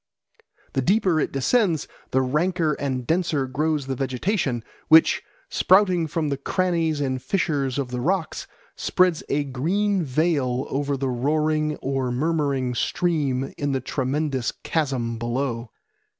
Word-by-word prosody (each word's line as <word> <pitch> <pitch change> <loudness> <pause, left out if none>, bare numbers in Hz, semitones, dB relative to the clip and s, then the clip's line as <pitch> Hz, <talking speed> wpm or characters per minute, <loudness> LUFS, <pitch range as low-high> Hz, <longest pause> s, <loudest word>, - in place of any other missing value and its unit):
The 135 - +1
deeper 185 - +2
it - - 0
descends, 165 - +1 0.2
the 130 0 +2
ranker 160 +4 +1
and 130 -3 -2
denser 160 -3 +1
grows 150 +2 -1
the 135 - -2
vegetation, 135 - -1 0.2
which, 160 +1 +6 0.3
sprouting 185 -3 +3
from 155 0 -1
the 140 - -1
crannies 165 0 0
and 130 -2 -1
fissures 140 -4 0
of 135 -3 -2
the 125 -1 -2
rocks, 175 +3 -1 0.3
spreads 180 -3 +2
a 145 +1 +1
green 180 +10 0
veil 135 -3 0
over 140 0 -1
the 135 0 -1
roaring 150 +4 +1
or 135 -2 -1
murmuring 140 -2 0
stream 135 -2 0
in 145 -1 0
the 135 - +1
tremendous 135 0 -1
chasm 130 -7 -1
below. 120 0 -2
145 Hz, 135 wpm, -24 LUFS, 130-165 Hz, 0.3 s, which